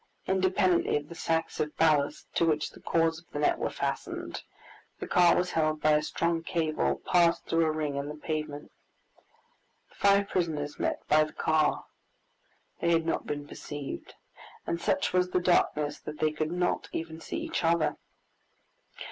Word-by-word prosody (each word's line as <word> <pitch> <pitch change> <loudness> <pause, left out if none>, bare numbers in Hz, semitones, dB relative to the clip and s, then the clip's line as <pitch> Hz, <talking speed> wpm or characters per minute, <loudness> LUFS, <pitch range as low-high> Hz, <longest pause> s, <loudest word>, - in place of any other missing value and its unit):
Independently 185 -2 +2
of 145 0 -7
the - - -7
sacks 165 -1 -1
of 150 0 -2
ballast, 150 -2 +2
to - - +2
which 155 -2 +1
the - - -15
cords 165 -1 +1
of 170 - -22
the - - -5
net 150 - +2
were - - -1
fastened, - - -4 0.6
the - - -4
car 175 -1 +5
was 180 0 0
held 155 -1 +1
by 155 - +3
a 150 0 +4
strong 170 +2 -1
cable 165 -2 -1
passed 170 -2 +3
through 165 0 +2
a - - +2
ring 150 -2 -2
in 140 +1 -3
the 150 - -6
pavement. 150 -1 -4 1.2
The - - -23
five 200 0 +4
prisoners 155 -6 -2
met - - -2
by 155 +1 +5
the 155 - -11
car. 155 -1 +1 0.9
They 170 - +1
had 165 -1 +3
not 165 - -1
been 145 0 -4
perceived, 145 -1 -7 0.5
and 170 - -2
such 285 -9 0
was 180 0 +2
the 180 - +1
darkness 150 -4 +1
that 150 - -8
they 155 +1 +1
could 155 +1 -2
not 180 0 -1
even 160 0 -5
see - - -5
each 330 - -3
other. 165 -1 +2
160 Hz, 175 wpm, -29 LUFS, 150-170 Hz, 1.2 s, car